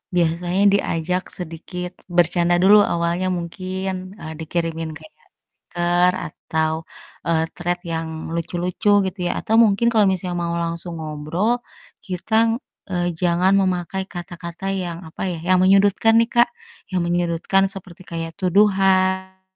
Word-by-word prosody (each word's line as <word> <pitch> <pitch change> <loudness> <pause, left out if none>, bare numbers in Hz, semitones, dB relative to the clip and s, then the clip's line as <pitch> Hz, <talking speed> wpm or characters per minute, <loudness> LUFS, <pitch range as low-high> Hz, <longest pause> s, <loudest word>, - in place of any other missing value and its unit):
biasanya 175 +2 +1
diajak 180 -1 0 0.2
sedikit 180 +2 -6 0.3
bercanda 175 0 +3
dulu 205 +2 +8 0.2
awalnya 170 +2 0
mungkin, 185 +2 -4 0.3
eee, 160 - -7
dikirimin 165 0 -2
kayak 310 - -16
stiker, 175 +1 -1 0.2
atau, 160 +1 -2 0.5
eee, 160 -1 +2
Threads 175 0 -2
yang 165 0 -2 0.3
lucu-lucu 175 +4 -2 0.2
gitu 190 +1 -7
ya, - - 0
atau 220 - 0
mungkin 215 +2 +3
kalau 215 -3 +4
misalnya 180 -1 -3
mau 170 0 -1
langsung 170 +1 -4
ngobrol, 155 +7 -1 0.5
kitang, 215 +5 +1 0.4
eee, 175 -1 0
jangan 180 +1 +3
memakai 185 0 -1
kata-kata 175 +1 -7 0.2
yang, 170 -2 -5
apa 160 - -10
ya, 170 - -4
yang 185 0 +5
menyudutkan 200 +3 +4
nih, 230 0 +2
Kak, 240 0 +5 0.4
yang 185 - +1
menyudutkan 175 +2 +1
seperti 185 -2 -11
kayak 165 0 -4
tuduhan. 190 -1 +2
175 Hz, 130 wpm, -21 LUFS, 170-190 Hz, 0.5 s, dulu